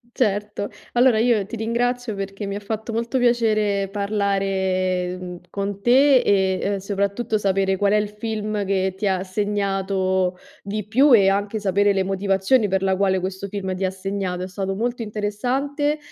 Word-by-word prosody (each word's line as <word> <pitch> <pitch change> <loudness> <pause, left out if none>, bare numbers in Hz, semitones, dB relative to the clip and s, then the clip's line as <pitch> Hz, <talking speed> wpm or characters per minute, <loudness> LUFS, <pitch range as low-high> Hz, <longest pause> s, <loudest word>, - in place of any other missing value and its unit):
Certo. 210 -3 -1 0.2
Allora 245 -2 +4
io 225 -3 +3
ti 230 - -6
ringrazio 235 +1 -1
perché 195 +1 -5
mi 200 - -4
ha 205 - -3
fatto 220 +2 -5
molto 235 +3 -1
piacere 215 -5 +2
parlare 195 -3 -1
mh 180 -1 -7
con 200 +1 -4
te 265 +3 +5
e 190 -2 +2
ehm 200 0 0
soprattutto 200 +3 -1
sapere 195 -1 +1
qual 205 +1 +2
è - - +5
il 210 -1 +1
film 215 -1 -3
che 190 -1 0
ti 205 +1 -2
ha 190 -1 0
segnato 190 -2 -1 0.2
di 205 +1 -4
più 265 +5 +5
e 195 -2 +5
anche 205 +2 -1
sapere 200 0 +2
le 190 - +1
motivazioni 195 +4 +1
per 190 0 0
la 190 -1 +2
quale 190 -1 +2
questo 190 +2 -4
film 190 -2 -4
ti 190 +1 -1
ha - - +1
segnato. 190 -1 -3
È - - -4
stato 195 +1 -3
molto 240 +3 -2
interessante 255 +8 -1
200 Hz, 170 wpm, -22 LUFS, 190-220 Hz, 0.2 s, te